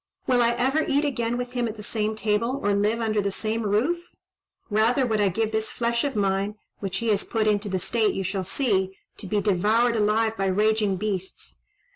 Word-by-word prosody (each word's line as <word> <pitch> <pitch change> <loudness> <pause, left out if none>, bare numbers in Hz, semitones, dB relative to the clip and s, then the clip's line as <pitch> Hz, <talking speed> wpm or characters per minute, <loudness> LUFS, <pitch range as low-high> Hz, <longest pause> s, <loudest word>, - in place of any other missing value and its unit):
Will 250 -2 +3
I 235 0 +3
ever 265 +6 +1
eat 285 +2 +2
again 240 -4 -1
with 245 0 -4
him 245 -1 -1
at 220 0 -6
the 210 - -8
same 215 0 -1
table, 220 +5 0
or 205 - +2
live 210 +3 +1
under 215 -2 +1
the 200 0 -1
same 220 +3 -2
roof? 225 +12 +1 0.7
Rather 230 +5 +3
would 220 -3 0
I 200 - +3
give 220 +4 -1
this 220 0 -1
flesh 235 0 0
of 280 -3 -2
mine, 200 0 0 0.2
which 190 -1 -3
he 230 +2 -1
has 205 -2 +2
put 220 -2 -1
into 210 -1 +1
the 190 - 0
state 220 +3 +1
you 195 - -2
shall 190 +1 -2
see, 190 -3 0 0.2
to 195 - -7
be 210 +1 0
devoured 215 +5 +2
alive 220 +1 +2
by 195 -1 -1
raging 210 +1 +2
beasts." 190 -2 -4
215 Hz, 210 wpm, -25 LUFS, 205-235 Hz, 0.7 s, Will